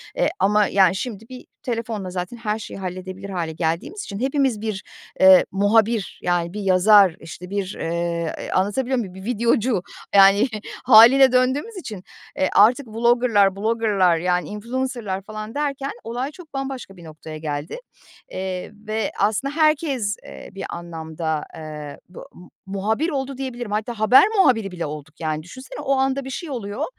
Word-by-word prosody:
eee, -, -, +2 dB
ama, 210 Hz, 0 st, +3 dB
yani, 190 Hz, -2 st, +4 dB
şimdi 225 Hz, 0 st, -5 dB
bir 255 Hz, -1 st, -10 dB, 0.2 s
telefonla 225 Hz, -5 st, -3 dB
zaten 180 Hz, +5 st, -5 dB
her 215 Hz, -1 st, -2 dB
şeyi 205 Hz, -, -8 dB
halledebilir 185 Hz, +1 st, -6 dB
hâle 175 Hz, -4 st, -3 dB
geldiğimiz 165 Hz, -, -3 dB
için 200 Hz, -1 st, -7 dB
hepimiz 265 Hz, -3 st, 0 dB
bir, 215 Hz, -3 st, -4 dB, 0.4 s
eee, 190 Hz, -1 st, +8 dB
muhabir, 210 Hz, +1 st, +1 dB
yani, 175 Hz, -1 st, 0 dB
bir 210 Hz, -, -4 dB
yazar, 195 Hz, -1 st, +5 dB
işte 180 Hz, +3 st, -10 dB
bir, 200 Hz, -1 st, -3 dB
eee, 170 Hz, 0 st, -3 dB
anlatabiliyor 245 Hz, +7 st, 0 dB
muyum? 195 Hz, -6 st, -5 dB
Bir 190 Hz, 0 st, -10 dB
videocu, 235 Hz, -2 st, +1 dB, 0.3 s
yani, 195 Hz, +4 st, +7 dB, 0.4 s
hâliyle 255 Hz, +3 st, +8 dB
döndüğümüz 260 Hz, -, +1 dB
için, 215 Hz, -, -7 dB, 0.3 s
e, 190 Hz, -, +1 dB
artık 245 Hz, +6 st, +5 dB
vlogger'lar, 225 Hz, -3 st, +3 dB
blogger'lar, 205 Hz, -4 st, +2 dB
yani, 180 Hz, -1 st, 0 dB
influencer'lar 230 Hz, -2 st, -3 dB
falan 215 Hz, +3 st, -8 dB
derken 280 Hz, -1 st, -2 dB
olay 245 Hz, +5 st, -4 dB
çok 315 Hz, -1 st, -15 dB
bambaşka 270 Hz, -7 st, -5 dB
bir 175 Hz, -, -13 dB
noktaya 155 Hz, 0 st, -9 dB
geldi, 150 Hz, 0 st, -4 dB, 0.5 s
eee, 185 Hz, 0 st, -4 dB, 0.2 s
ve 215 Hz, -1 st, -1 dB
aslında 220 Hz, +8 st, 0 dB
herkes, 285 Hz, -9 st, +1 dB
eee, -, -, -10 dB
bir 195 Hz, -, -7 dB
anlamda, 160 Hz, -2 st, -4 dB
eee, 150 Hz, -2 st, -8 dB
bu 180 Hz, -, -12 dB
mu 180 Hz, -, -15 dB, 0.2 s
muhabir 210 Hz, -, -1 dB
oldu 270 Hz, -3 st, -3 dB
diyebilirim. 245 Hz, -4 st, -5 dB
Hatta 215 Hz, +2 st, -3 dB
haber 215 Hz, +4 st, +7 dB
muhabiri 225 Hz, -, +3 dB
bile 175 Hz, -2 st, -4 dB
olduk, 150 Hz, +1 st, -8 dB
yani, 155 Hz, -1 st, -2 dB
düşünsene 260 Hz, +10 st, -10 dB
o 280 Hz, -2 st, 0 dB
anda 270 Hz, +1 st, 0 dB
bir -, -, -6 dB
şey 330 Hz, +4 st, -6 dB
oluyor, 235 Hz, 0 st, -4 dB
210 Hz, 155 wpm, -22 LUFS, 185-250 Hz, 0.5 s, eee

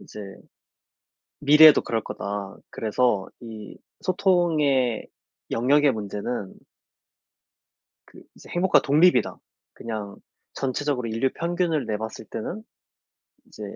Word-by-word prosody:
"...이제 -, -, -12 dB, 1.2 s
미래에도 150 Hz, +1 st, +7 dB
그럴 115 Hz, -1 st, -2 dB
거다." 100 Hz, -1 st, -6 dB
그래서 110 Hz, -2 st, 0 dB
이 110 Hz, -3 st, -10 dB, 0.2 s
소통의 160 Hz, -, +1 dB, 0.4 s
영역의 140 Hz, +5 st, +3 dB
문제는 105 Hz, -1 st, -5 dB, 1.5 s
그 -, -, -16 dB
이제 -, -, -16 dB
"행복과 180 Hz, +2 st, +3 dB
독립이다. 150 Hz, -3 st, +3 dB, 0.4 s
그냥 105 Hz, -3 st, -6 dB, 0.4 s
전체적으로 135 Hz, -2 st, -2 dB
인류 115 Hz, +4 st, 0 dB
평균을 170 Hz, -3 st, -1 dB
내 105 Hz, -1 st, -2 dB
봤을 110 Hz, 0 st, -7 dB
때는 170 Hz, -, -6 dB, 0.8 s
이제 -, -, -13 dB
125 Hz, 225 characters per minute, -24 LUFS, 110-155 Hz, 1.5 s, 미래에도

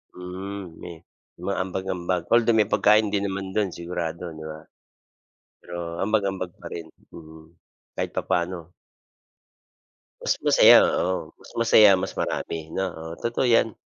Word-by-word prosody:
Mm, 90 Hz, 0 st, -7 dB
me 90 Hz, -, -7 dB, 0.5 s
mga -, -, -2 dB
ambag-ambag, 90 Hz, -1 st, -3 dB
although 115 Hz, 0 st, +4 dB
may 105 Hz, -, +3 dB
pagkain 105 Hz, +1 st, +4 dB
din 100 Hz, -1 st, 0 dB
naman 95 Hz, -1 st, -4 dB
do'n 105 Hz, -3 st, +1 dB
sigurado, 85 Hz, -1 st, -5 dB
di 80 Hz, -, -9 dB
ba? 80 Hz, 0 st, -10 dB, 1.0 s
Pero 85 Hz, -1 st, -6 dB
ambag-ambag 100 Hz, -3 st, 0 dB
pa -, -, -11 dB
rin? 85 Hz, -1 st, -6 dB, 0.2 s
Mm, 80 Hz, 0 st, -13 dB, 0.4 s
kahit -, -, -3 dB
papaano? 85 Hz, -1 st, -2 dB, 1.5 s
Mas -, -, 0 dB
masaya, -, -, +8 dB
oo. 95 Hz, +1 st, -1 dB
Mas -, -, -15 dB
masaya 110 Hz, -3 st, +7 dB
mas -, -, -4 dB
marami, 80 Hz, -1 st, -3 dB
no? 95 Hz, -, +1 dB
Oo, 80 Hz, 0 st, -8 dB
totoo 120 Hz, +2 st, -1 dB
yan. 115 Hz, -1 st, +2 dB
90 Hz, 135 wpm, -24 LUFS, 85-100 Hz, 1.5 s, masaya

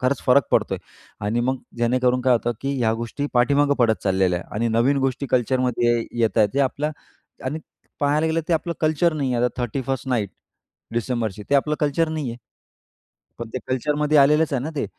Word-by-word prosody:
खरंच 130 Hz, +1 st, 0 dB
फरक 130 Hz, +2 st, +5 dB
पडतो -, -, +2 dB
आहे -, -, -7 dB, 0.5 s
आणि 115 Hz, +3 st, 0 dB
मग 130 Hz, +2 st, 0 dB, 0.2 s
जेणेकरून 125 Hz, +1 st, +2 dB
काय 130 Hz, 0 st, +4 dB
होतं 120 Hz, 0 st, +1 dB
की 140 Hz, 0 st, -2 dB
ह्या 115 Hz, -3 st, +2 dB
गोष्टी 115 Hz, +5 st, -4 dB
पाठीमागं 140 Hz, +4 st, +3 dB
पडत 115 Hz, -3 st, +2 dB
चाललेल्या 95 Hz, -2 st, +2 dB
आहे -, -, -13 dB
आणि 115 Hz, +2 st, 0 dB
नवीन 120 Hz, +5 st, +2 dB
गोष्टी 135 Hz, +1 st, -1 dB
कल्चरमध्ये 125 Hz, -1 st, +2 dB, 0.2 s
येत 115 Hz, 0 st, +1 dB
आहेत. 105 Hz, -2 st, +5 dB
जे 140 Hz, -, +2 dB
आपल्या 140 Hz, +3 st, 0 dB, 0.6 s
आणि 150 Hz, +4 st, -2 dB, 0.4 s
पाहायला 150 Hz, +2 st, +2 dB
गेलं 160 Hz, +1 st, +1 dB
ते -, -, +1 dB
आपलं 170 Hz, +1 st, 0 dB
कल्चर 155 Hz, +2 st, +2 dB
नाही 135 Hz, -4 st, -1 dB
आहे. 120 Hz, +1 st, +1 dB
आता 125 Hz, 0 st, -2 dB
31st 130 Hz, +3 st, -3 dB
नाईट 110 Hz, -6 st, 0 dB, 0.6 s
डिसेंबरची, 115 Hz, -3 st, -2 dB
ते -, -, +3 dB
आपलं 150 Hz, +2 st, +2 dB
कल्चर 150 Hz, +2 st, +1 dB
नाही 155 Hz, -4 st, -3 dB
आहे. 115 Hz, -, -7 dB, 1.0 s
पण 120 Hz, -1 st, -6 dB
ते 130 Hz, -, 0 dB
कल्चरमध्ये 150 Hz, +4 st, +1 dB
आलेलंच 150 Hz, +3 st, +4 dB
आहे 130 Hz, -2 st, 0 dB
ना 155 Hz, -, -4 dB
ते. 140 Hz, -, 0 dB
130 Hz, 190 wpm, -22 LUFS, 120-145 Hz, 1.0 s, फरक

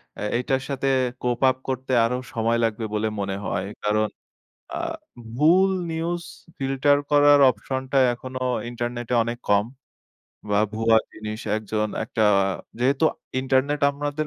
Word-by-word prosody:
অ্যা -, -, -6 dB
এটার 130 Hz, +1 st, 0 dB
সাথে 135 Hz, -1 st, -2 dB, 0.4 s
cope 125 Hz, +1 st, -1 dB
up 130 Hz, -, -1 dB
করতে 130 Hz, 0 st, -3 dB
আরো 125 Hz, +2 st, 0 dB, 0.2 s
সময় 115 Hz, +1 st, +1 dB
লাগবে 110 Hz, 0 st, -1 dB
বলে 110 Hz, +1 st, 0 dB
মনে 95 Hz, -1 st, -2 dB
হয়। 95 Hz, -, -2 dB, 0.2 s
কারণ 105 Hz, +1 st, +2 dB, 0.7 s
আ -, -, -3 dB, 0.6 s
ভুল 180 Hz, +7 st, +5 dB, 0.2 s
news 170 Hz, +1 st, -2 dB, 0.3 s
filter 135 Hz, +1 st, +2 dB
করার 145 Hz, 0 st, +6 dB
অপশনটা 130 Hz, +2 st, -4 dB, 0.2 s
এখনো 130 Hz, +2 st, -7 dB, 0.3 s
ইন্টারনেটে 120 Hz, 0 st, -3 dB
অনেক 120 Hz, +1 st, -4 dB
কম। 105 Hz, +1 st, +3 dB, 0.8 s
বা 105 Hz, -, +3 dB
ভুয়া 115 Hz, +1 st, +3 dB, 0.2 s
জিনিস 110 Hz, 0 st, -6 dB, 0.2 s
একজন 110 Hz, 0 st, -2 dB, 0.2 s
একটা 110 Hz, -, -2 dB, 0.6 s
যেহেতু 135 Hz, +5 st, +2 dB, 0.4 s
ইন্টারনেট 135 Hz, +2 st, +1 dB
আমাদের 145 Hz, +1 st, -3 dB
125 Hz, 130 wpm, -24 LUFS, 110-140 Hz, 0.8 s, করার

